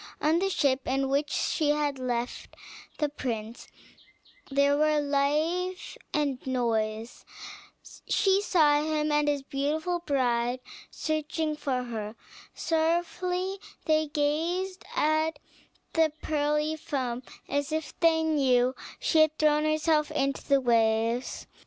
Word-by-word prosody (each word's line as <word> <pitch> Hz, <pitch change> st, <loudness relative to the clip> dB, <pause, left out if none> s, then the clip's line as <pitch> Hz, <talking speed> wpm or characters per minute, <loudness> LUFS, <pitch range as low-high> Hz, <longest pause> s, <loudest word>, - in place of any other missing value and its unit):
On 315 Hz, +3 st, +2 dB
the 390 Hz, +1 st, +1 dB
ship, 270 Hz, -7 st, +1 dB
in 270 Hz, +1 st, 0 dB
which 285 Hz, +2 st, +1 dB
she 305 Hz, 0 st, 0 dB
had 295 Hz, -2 st, 0 dB
left 245 Hz, -1 st, -3 dB, 0.4 s
the 300 Hz, -, +1 dB
prince, 235 Hz, -5 st, -5 dB, 0.8 s
there 280 Hz, +1 st, +3 dB
were 305 Hz, 0 st, +3 dB
life 305 Hz, +6 st, 0 dB, 0.2 s
and 285 Hz, -4 st, 0 dB
noise; 225 Hz, -3 st, -1 dB, 0.9 s
she 390 Hz, 0 st, +3 dB
saw 300 Hz, -7 st, +4 dB
him 305 Hz, -1 st, 0 dB
and 295 Hz, 0 st, +2 dB
his 290 Hz, -2 st, 0 dB
beautiful 305 Hz, +6 st, -1 dB
bride 250 Hz, -5 st, 0 dB, 0.3 s
searching 310 Hz, 0 st, -2 dB
for 265 Hz, -4 st, -2 dB
her; 220 Hz, -3 st, -5 dB, 0.4 s
sorrowfully 350 Hz, +4 st, 0 dB, 0.3 s
they 310 Hz, -1 st, +2 dB
gazed 330 Hz, +6 st, -1 dB
at 310 Hz, 0 st, +1 dB, 0.6 s
the 320 Hz, -2 st, +3 dB
pearly 300 Hz, 0 st, 0 dB
foam, 255 Hz, -5 st, -3 dB, 0.3 s
as 285 Hz, +1 st, -1 dB
if 315 Hz, 0 st, -3 dB
they 325 Hz, -1 st, +4 dB
knew 260 Hz, -5 st, +3 dB, 0.3 s
she 320 Hz, -, +2 dB
had 310 Hz, 0 st, +4 dB
thrown 300 Hz, 0 st, +3 dB
herself 310 Hz, 0 st, +2 dB
into 275 Hz, -2 st, -1 dB
the 275 Hz, -1 st, +3 dB
waves. 230 Hz, 0 st, +1 dB
295 Hz, 120 wpm, -28 LUFS, 260-315 Hz, 0.9 s, saw